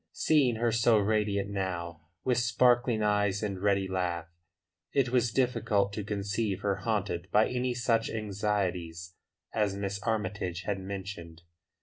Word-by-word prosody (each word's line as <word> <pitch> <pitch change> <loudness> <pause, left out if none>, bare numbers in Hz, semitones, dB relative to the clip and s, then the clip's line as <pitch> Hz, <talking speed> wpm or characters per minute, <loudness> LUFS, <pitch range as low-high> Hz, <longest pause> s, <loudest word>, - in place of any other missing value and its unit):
Seeing 140 -7 +3
her 115 +1 +1
so 115 0 +4
radiant 100 -1 +1
now, 85 -4 -3 0.2
with 125 -1 +2
sparkling 120 -1 +3
eyes 105 -1 +1
and 100 -3 -3
ready 100 -1 +2
laugh, 90 -3 -2 0.7
it 135 -3 +2
was 120 -2 +2
difficult 105 -6 +1
to 105 - -3
conceive 100 0 -2
her 100 -2 0
haunted 100 -4 -2
by 110 +1 +5
any 125 0 -1
such 115 -2 +1
anxieties 95 -5 -2 0.4
as 105 -3 +1
Miss 100 0 -3
Armytage 100 -5 -2
had 100 +1 -2
mentioned. 95 -4 -7
100 Hz, 135 wpm, -30 LUFS, 95-115 Hz, 0.7 s, by